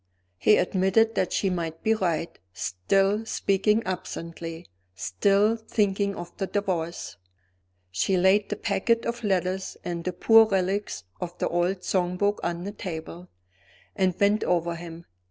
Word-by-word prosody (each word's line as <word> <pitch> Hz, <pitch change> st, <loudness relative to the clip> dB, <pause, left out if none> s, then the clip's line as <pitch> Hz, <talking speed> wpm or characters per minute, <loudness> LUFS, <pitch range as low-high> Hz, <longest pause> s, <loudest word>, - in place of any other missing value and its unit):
He 210 Hz, -, +5 dB
admitted 190 Hz, +5 st, +2 dB
that 185 Hz, -, 0 dB
she 195 Hz, -, +1 dB
might 165 Hz, -2 st, -4 dB
be 220 Hz, -, +3 dB
right; 175 Hz, -6 st, -2 dB
still 195 Hz, -, +1 dB
speaking 210 Hz, 0 st, +1 dB
absently, 165 Hz, -2 st, -5 dB, 0.3 s
still 200 Hz, -, +2 dB
thinking 200 Hz, -3 st, 0 dB
of 175 Hz, 0 st, -8 dB
the 195 Hz, -, -2 dB
Divorce. 180 Hz, -5 st, -3 dB, 0.7 s
She 140 Hz, -, +1 dB
laid 195 Hz, +3 st, +3 dB
the -, -, -1 dB
packet 230 Hz, +4 st, 0 dB
of 235 Hz, 0 st, -3 dB
letters 190 Hz, -1 st, -1 dB
and 170 Hz, -1 st, -4 dB
the 180 Hz, -, -2 dB
poor 225 Hz, +4 st, +6 dB
relics 195 Hz, 0 st, -1 dB, 0.2 s
of 175 Hz, -1 st, -6 dB
the -, -, 0 dB
old 180 Hz, +2 st, 0 dB
song 180 Hz, -1 st, 0 dB
book 205 Hz, +2 st, +1 dB
on 170 Hz, 0 st, -3 dB
the 200 Hz, -, -4 dB
table, 175 Hz, -2 st, -7 dB, 0.7 s
and 185 Hz, -2 st, +1 dB
bent 205 Hz, +1 st, +3 dB
over 170 Hz, -1 st, +1 dB
him. 170 Hz, 0 st, -9 dB
190 Hz, 145 wpm, -26 LUFS, 175-205 Hz, 0.7 s, poor